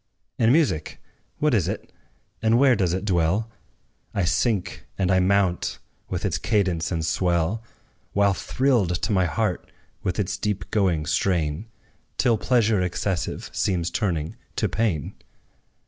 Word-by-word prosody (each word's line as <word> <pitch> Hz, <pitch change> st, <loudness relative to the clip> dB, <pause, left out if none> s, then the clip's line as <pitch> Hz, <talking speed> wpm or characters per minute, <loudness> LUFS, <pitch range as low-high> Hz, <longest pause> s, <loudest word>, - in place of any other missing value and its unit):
And 115 Hz, 0 st, +5 dB
music 140 Hz, -, +1 dB, 0.4 s
what 150 Hz, -2 st, +2 dB
is 100 Hz, -8 st, +2 dB
it? -, -, -5 dB, 0.5 s
and 110 Hz, +1 st, +4 dB
where 130 Hz, -1 st, +5 dB
does 95 Hz, -5 st, +1 dB
it 95 Hz, +3 st, -2 dB
dwell? 95 Hz, +4 st, +1 dB, 0.6 s
I 100 Hz, -, +1 dB
sink, 100 Hz, +2 st, 0 dB
and 95 Hz, -1 st, +1 dB
I 95 Hz, -, +4 dB
mount, 95 Hz, -1 st, +1 dB, 0.3 s
with -, -, -2 dB
its -, -, 0 dB
cadence 95 Hz, -7 st, 0 dB
and 80 Hz, -2 st, -1 dB
swell, 85 Hz, +5 st, +1 dB, 0.5 s
While 100 Hz, -1 st, +3 dB
thrilled 110 Hz, -7 st, +1 dB
to -, -, -1 dB
my 95 Hz, -3 st, +3 dB
heart, 95 Hz, +1 st, -2 dB, 0.3 s
with 90 Hz, -, -2 dB
its 100 Hz, -2 st, -1 dB
deep 100 Hz, -3 st, -3 dB
going 90 Hz, -7 st, +1 dB
strain, 80 Hz, +2 st, 0 dB, 0.5 s
Till 115 Hz, -4 st, +3 dB
pleasure 115 Hz, -5 st, +2 dB
excessive 90 Hz, 0 st, -2 dB
seems 90 Hz, -3 st, 0 dB
turning 85 Hz, -8 st, -1 dB, 0.2 s
to -, -, +1 dB
pain. 105 Hz, -10 st, -1 dB
95 Hz, 140 wpm, -24 LUFS, 85-110 Hz, 0.6 s, And